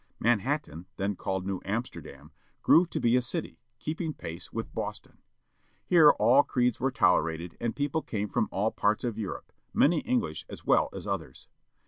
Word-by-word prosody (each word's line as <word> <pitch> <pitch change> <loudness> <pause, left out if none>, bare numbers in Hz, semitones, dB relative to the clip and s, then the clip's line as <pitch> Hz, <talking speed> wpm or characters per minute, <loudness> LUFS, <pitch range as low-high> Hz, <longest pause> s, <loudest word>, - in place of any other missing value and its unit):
Manhattan, 115 - 0
then 100 +1 -1
called 95 0 -3
New 95 -1 -3
Amsterdam, 115 +5 -5 0.3
grew 170 +2 +6
to - - -4
be 120 +1 +3
a 125 - +4
city, 125 - -3 0.2
keeping 155 +3 -4
pace 85 +1 -8
with - - -5
Boston. - - -6 0.7
Here 165 -4 +7
all 120 +6 +6
creeds 125 -4 0
were 130 +2 +1
tolerated, 85 -7 +1
and 115 -1 -1
people 145 +2 -1
came 105 -6 -3
from 105 - -1
all 105 +3 0
parts 105 +1 0
of 115 -3 -3
Europe, 100 -3 -6 0.2
many 160 +2 +4
English 245 -2 -1
as - - -10
well - - +3
as - - -8
others. - - -5
115 Hz, 165 wpm, -28 LUFS, 95-145 Hz, 0.7 s, Here